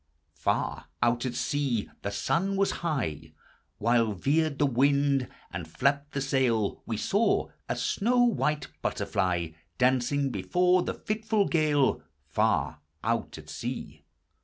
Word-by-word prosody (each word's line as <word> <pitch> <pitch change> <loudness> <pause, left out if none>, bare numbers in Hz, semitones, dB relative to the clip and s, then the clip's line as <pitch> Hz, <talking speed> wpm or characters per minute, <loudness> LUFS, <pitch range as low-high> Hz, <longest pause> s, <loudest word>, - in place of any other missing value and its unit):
Far 75 - -1 0.2
out 120 +1 +2
at 120 - -4
sea 130 -5 0
— - - -39
the 100 - -2
sun 180 - 0
was 195 0 +2
high, 80 - -2 0.4
"While 115 -1 +2
veered 145 - +1
the 145 - +3
wind, 140 0 +2 0.3
and - - -5
flapped 140 +2 0
the 140 - -1
sail 130 -6 +1
We 110 - -2
saw. 205 - +1 0.2
a - - 0
snow 245 +4 +2
white 150 - +1
butterfly 85 -3 0 0.3
Dancing 130 +2 +2
before 180 - +2
the - - -3
fitful 215 -1 0
gale, 150 -4 +2 0.3
Far - - +1 0.2
out 115 -4 -1
at 75 -1 -12
sea 80 - -6
135 Hz, 135 wpm, -28 LUFS, 115-155 Hz, 0.4 s, the